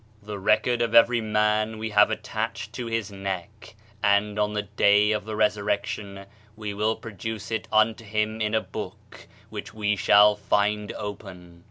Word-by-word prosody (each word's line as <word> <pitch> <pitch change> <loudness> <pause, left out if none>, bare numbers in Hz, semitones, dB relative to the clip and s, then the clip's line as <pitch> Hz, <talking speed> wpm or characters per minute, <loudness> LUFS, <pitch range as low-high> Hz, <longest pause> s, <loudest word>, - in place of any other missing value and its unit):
"The 105 -1 -6
record 110 +4 +2
of 115 -2 0
every 115 0 +6
man 105 0 +1
we 110 0 -4
have 105 0 +5
attached - - -4
to 120 - -5
his 115 -3 -2
neck 100 +2 -6 0.3
and 100 +1 +2
on 105 0 +1
the 105 -1 -1
day 105 +1 +3
of 105 -2 -1
the 110 -1 -5
resurrection, 100 -1 -1 0.3
we 105 -1 -5
will 105 +2 0
produce 110 0 -7
it 110 -1 -2
unto 110 +1 +2
him 110 +1 -2
in 105 0 0
a 110 - +2
book 95 - -9 0.2
which 100 - -7
we 105 -1 0
shall 105 +1 +5
find 105 +1 0
open." 90 -4 -8
105 Hz, 165 wpm, -25 LUFS, 100-110 Hz, 0.3 s, every